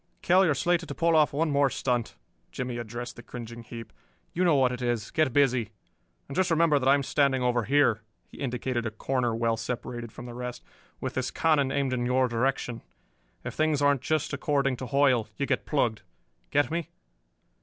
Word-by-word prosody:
"Kell, 185 Hz, +2 st, +5 dB
you 180 Hz, -, +3 dB
are 150 Hz, -, +2 dB
slated 175 Hz, +1 st, 0 dB
to -, -, -5 dB
pull 165 Hz, -1 st, +2 dB
off 155 Hz, -1 st, +4 dB
one 155 Hz, +2 st, 0 dB
more 140 Hz, -1 st, +3 dB
stunt," 125 Hz, -3 st, -1 dB, 0.4 s
Jimmie 125 Hz, -2 st, -4 dB
addressed 120 Hz, +1 st, -6 dB
the -, -, -8 dB
cringing 120 Hz, -1 st, -8 dB
heap. 115 Hz, 0 st, -9 dB, 0.4 s
"You 180 Hz, -, 0 dB
know 170 Hz, -4 st, +4 dB
what 130 Hz, -2 st, +3 dB
it 125 Hz, 0 st, -5 dB
is. 120 Hz, -3 st, -1 dB
Get 155 Hz, -4 st, +2 dB
busy. 130 Hz, -5 st, +2 dB, 0.6 s
And 135 Hz, -, -7 dB
just 185 Hz, -1 st, +2 dB
remember 165 Hz, -3 st, +3 dB
that 130 Hz, 0 st, +2 dB
I 140 Hz, -, +7 dB
am 140 Hz, -, -1 dB
standing 135 Hz, -2 st, +2 dB
over 120 Hz, -2 st, +1 dB
here" 125 Hz, -4 st, +3 dB, 0.2 s
he -, -, -15 dB
indicated 125 Hz, -2 st, -2 dB
a -, -, -1 dB
corner 120 Hz, +1 st, -1 dB
well 115 Hz, 0 st, 0 dB
separated 120 Hz, 0 st, -5 dB
from -, -, -10 dB
the 120 Hz, -, -8 dB
rest 125 Hz, 0 st, -6 dB, 0.4 s
"with -, -, -4 dB
this -, -, -1 dB
cannon 150 Hz, -4 st, +2 dB
aimed 135 Hz, -2 st, 0 dB
in 120 Hz, -1 st, -1 dB
your 130 Hz, +1 st, +3 dB
direction. 120 Hz, 0 st, -1 dB, 0.6 s
If -, -, -5 dB
things 155 Hz, -2 st, +1 dB
aren't 145 Hz, -2 st, +3 dB
just 155 Hz, -2 st, -1 dB
according 140 Hz, -2 st, 0 dB
to 130 Hz, -, -6 dB
Hoyle, 130 Hz, -4 st, +3 dB
you 140 Hz, -, 0 dB
get -, -, -1 dB
plugged. 120 Hz, -7 st, 0 dB, 0.5 s
Get 145 Hz, +1 st, +2 dB
me?" 170 Hz, -2 st, -2 dB
130 Hz, 200 wpm, -27 LUFS, 120-145 Hz, 0.6 s, I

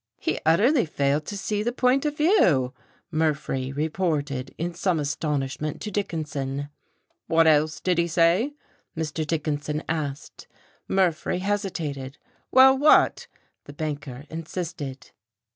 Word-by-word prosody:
"He -, -, -1 dB
utterly 225 Hz, -, +4 dB
failed 145 Hz, 0 st, 0 dB
to 205 Hz, -, -4 dB
see 210 Hz, +1 st, -2 dB
the 235 Hz, +3 st, 0 dB
point 255 Hz, +3 st, +2 dB
of 295 Hz, 0 st, -3 dB
view," 175 Hz, -, +3 dB, 0.4 s
Murphree 150 Hz, -4 st, -1 dB
reported 145 Hz, -3 st, -2 dB
in 170 Hz, +2 st, -3 dB
some 175 Hz, -1 st, 0 dB
astonishment 145 Hz, 0 st, -2 dB
to 210 Hz, -, -5 dB
Dickinson. 145 Hz, -7 st, -3 dB, 0.6 s
"What 165 Hz, 0 st, +4 dB
else 155 Hz, -1 st, +3 dB
did 180 Hz, -2 st, +1 dB
he 170 Hz, -, +2 dB
say?" 175 Hz, -, +2 dB, 0.4 s
Mr. 155 Hz, -1 st, -2 dB
Dickinson 150 Hz, -1 st, -2 dB
asked. 150 Hz, -3 st, -4 dB, 0.4 s
Murphree 180 Hz, -4 st, +1 dB
hesitated. 170 Hz, -9 st, -3 dB, 0.3 s
"Well 265 Hz, +1 st, +8 dB
what?" 290 Hz, +3 st, +4 dB, 0.4 s
the 145 Hz, -, -10 dB
banker 145 Hz, -3 st, -5 dB
insisted. 160 Hz, -4 st, -6 dB
160 Hz, 120 wpm, -25 LUFS, 145-190 Hz, 0.6 s, Well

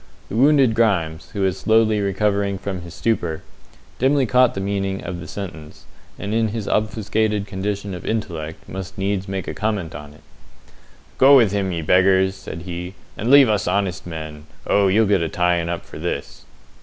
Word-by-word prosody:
The -, -, -5 dB
wounded 135 Hz, -1 st, +4 dB
Grimes, 85 Hz, -8 st, 0 dB
who 100 Hz, -, -3 dB
was 95 Hz, -1 st, 0 dB
slowly 110 Hz, -1 st, +3 dB
recovering 100 Hz, 0 st, 0 dB
from 95 Hz, -1 st, -5 dB
his 85 Hz, -1 st, -10 dB
stupor, 85 Hz, -8 st, -1 dB, 0.6 s
dimly 135 Hz, +1 st, +3 dB
caught 125 Hz, +1 st, +3 dB
the -, -, -2 dB
meaning 95 Hz, -1 st, -2 dB
of 85 Hz, 0 st, -5 dB
the 80 Hz, -, -8 dB
sentence, 85 Hz, -6 st, -8 dB, 0.3 s
and 100 Hz, +1 st, -4 dB
in 115 Hz, 0 st, +2 dB
his 110 Hz, -1 st, -4 dB
obfuscated 105 Hz, -1 st, 0 dB
condition 100 Hz, 0 st, -4 dB
of 90 Hz, -, -7 dB
intellect 85 Hz, -8 st, -4 dB
must 95 Hz, -1 st, -7 dB
needs 95 Hz, 0 st, -1 dB
make 95 Hz, -1 st, -4 dB
comment 105 Hz, -7 st, -2 dB
upon 75 Hz, 0 st, -9 dB
it. 75 Hz, -, -19 dB, 1.0 s
"Go 140 Hz, +2 st, +8 dB
with 115 Hz, -6 st, +4 dB
him, 100 Hz, -2 st, -1 dB
ye 85 Hz, -2 st, -3 dB
beggars!" 95 Hz, +3 st, +4 dB
said 85 Hz, -3 st, -8 dB
he, 90 Hz, +1 st, -6 dB, 0.2 s
"and 115 Hz, -, -3 dB
leave 140 Hz, -1 st, +8 dB
us 105 Hz, -4 st, 0 dB
honest 95 Hz, -1 st, -1 dB
men! 80 Hz, -2 st, -7 dB, 0.2 s
Oh, 100 Hz, -1 st, +3 dB
ye'll 110 Hz, +4 st, +4 dB
get 100 Hz, -3 st, +2 dB
a 80 Hz, -, -1 dB
tying 90 Hz, -1 st, +1 dB
up 85 Hz, -1 st, -4 dB
for -, -, -10 dB
this." -, -, -5 dB
95 Hz, 180 wpm, -21 LUFS, 90-110 Hz, 1.0 s, Go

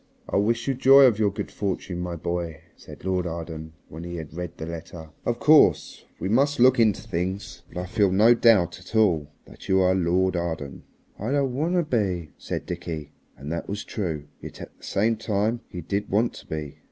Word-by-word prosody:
"I -, -, 0 dB
wish 115 Hz, +5 st, +1 dB
you 135 Hz, -, +2 dB
joy 135 Hz, +2 st, +7 dB
of 120 Hz, -5 st, +5 dB
your 105 Hz, -2 st, +3 dB
good 100 Hz, -, -6 dB
fortune, 95 Hz, -3 st, -3 dB
my 90 Hz, -1 st, -3 dB
boy," 85 Hz, -1 st, -4 dB
said -, -, -13 dB
Lord 90 Hz, -1 st, 0 dB
Arden 80 Hz, -1 st, -6 dB
when 80 Hz, +2 st, -9 dB
he 85 Hz, 0 st, -6 dB
had 80 Hz, -3 st, -7 dB
read 90 Hz, 0 st, -6 dB
the 80 Hz, -, -5 dB
letter. 80 Hz, -1 st, -8 dB, 0.2 s
"Of 120 Hz, -, +1 dB
course 155 Hz, +4 st, +4 dB
we -, -, -2 dB
must 140 Hz, +7 st, +2 dB
look 130 Hz, +1 st, +6 dB
into 110 Hz, -4 st, +3 dB
things, 95 Hz, +3 st, -4 dB
but -, -, -9 dB
I 90 Hz, -, -3 dB
feel 100 Hz, 0 st, +2 dB
no 110 Hz, +5 st, +6 dB
doubt 115 Hz, -8 st, +4 dB
at 95 Hz, +4 st, -11 dB
all 90 Hz, -9 st, +3 dB, 0.2 s
that -, -, -14 dB
you 95 Hz, 0 st, +4 dB
are 95 Hz, 0 st, +4 dB
Lord 95 Hz, 0 st, +1 dB
Arden!" 80 Hz, -6 st, -4 dB, 0.4 s
"I 105 Hz, -, -3 dB
don't 140 Hz, -2 st, +1 dB
want 160 Hz, +7 st, 0 dB
to 175 Hz, -, +3 dB
be," 95 Hz, -, -1 dB
said -, -, -4 dB
Dickie, 85 Hz, -4 st, -5 dB, 0.3 s
and 70 Hz, +3 st, -7 dB
that 85 Hz, -, -4 dB
was 100 Hz, +1 st, -3 dB
true. 80 Hz, -8 st, -4 dB, 0.2 s
Yet -, -, -9 dB
at -, -, -10 dB
the -, -, -25 dB
same 110 Hz, +3 st, +1 dB
time 110 Hz, +2 st, 0 dB
he 90 Hz, -, -7 dB
did 100 Hz, +5 st, -3 dB
want 110 Hz, +4 st, +1 dB
to -, -, -12 dB
be. 75 Hz, -3 st, -6 dB
95 Hz, 210 wpm, -25 LUFS, 85-115 Hz, 0.4 s, joy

